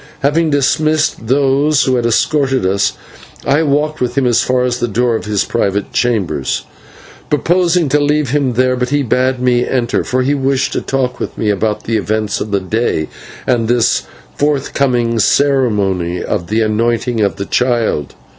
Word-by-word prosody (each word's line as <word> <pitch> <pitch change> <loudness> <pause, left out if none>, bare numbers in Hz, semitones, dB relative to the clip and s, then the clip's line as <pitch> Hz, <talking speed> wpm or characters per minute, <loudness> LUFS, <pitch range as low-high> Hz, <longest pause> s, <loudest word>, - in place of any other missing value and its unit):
Having 155 +3 +2
dismissed 155 -2 +1
those 140 +2 +2
who 130 - +1
had 120 -1 +1
escorted 135 +1 +1
us, 100 +2 +1 0.5
I 140 +3 +2
walked 150 +1 0
with 125 0 -2
him 135 - +2
as 120 -2 +3
far 125 0 +1
as 125 -1 -1
the 120 - 0
door 120 +2 0
of 110 - -4
his 105 -2 0
private 100 -3 -1
chambers, 95 - -1 0.7
purposing 175 +2 +2
to 150 - +2
leave 145 -2 +1
him 140 -3 +1
there; 130 +1 +2
but 125 0 -2
he 145 +1 +1
bade 130 +1 +1
me 125 -1 +2
enter, 125 -2 -1
for 130 0 0
he 140 +3 +1
wished 135 -1 0
to - - -1
talk 125 -2 -2
with - - -5
me 105 -2 +1
about 105 +1 -1
the 115 0 -1
events 110 0 -2
of 110 - -3
the 100 -1 +1
day 95 -4 -1 0.4
and 120 -3 +1
this 120 -1 +2 0.3
forthcoming 135 -5 0
ceremony 105 -10 +1
of 90 -5 -3
the 110 +2 0
anointing 115 +2 0
of 100 - +1
the 100 - -5
child. 120 - 0
125 Hz, 175 wpm, -15 LUFS, 110-140 Hz, 0.7 s, as